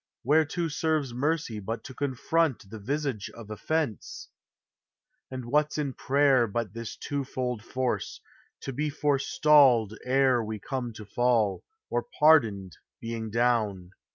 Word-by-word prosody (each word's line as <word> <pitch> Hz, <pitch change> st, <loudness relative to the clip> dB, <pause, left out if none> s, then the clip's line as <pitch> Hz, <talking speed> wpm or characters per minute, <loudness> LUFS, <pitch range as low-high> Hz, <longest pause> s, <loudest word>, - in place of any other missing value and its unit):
Whereto 160 Hz, +5 st, +2 dB
serves 155 Hz, -4 st, -1 dB
mercy 140 Hz, -3 st, -1 dB
But 110 Hz, +3 st, -5 dB
to 130 Hz, -, -9 dB
confront 140 Hz, -3 st, -1 dB
the 110 Hz, -, -7 dB
visage 135 Hz, -2 st, -3 dB
of 110 Hz, -2 st, -10 dB
offence? 160 Hz, -, -3 dB, 1.0 s
And 130 Hz, -2 st, -6 dB
what 150 Hz, +5 st, +1 dB
's -, -, -4 dB
in 145 Hz, -3 st, -2 dB
prayer 135 Hz, -3 st, +3 dB
but 110 Hz, -1 st, -3 dB
this 115 Hz, -1 st, -6 dB
twofold 130 Hz, -4 st, -3 dB
force, 130 Hz, +1 st, -3 dB, 0.4 s
To 135 Hz, -, -5 dB
be 150 Hz, +4 st, -1 dB
forestalled 140 Hz, -5 st, +3 dB
ere 130 Hz, -2 st, +3 dB
we 110 Hz, 0 st, -4 dB
come 125 Hz, +3 st, -4 dB
to 110 Hz, 0 st, -10 dB
fall. 115 Hz, -2 st, +1 dB, 0.3 s
Or -, -, +1 dB, 0.2 s
pardoned 110 Hz, -, +3 dB, 0.2 s
being 115 Hz, -1 st, -5 dB
down? 110 Hz, -6 st, 0 dB
125 Hz, 130 wpm, -27 LUFS, 110-145 Hz, 1.0 s, prayer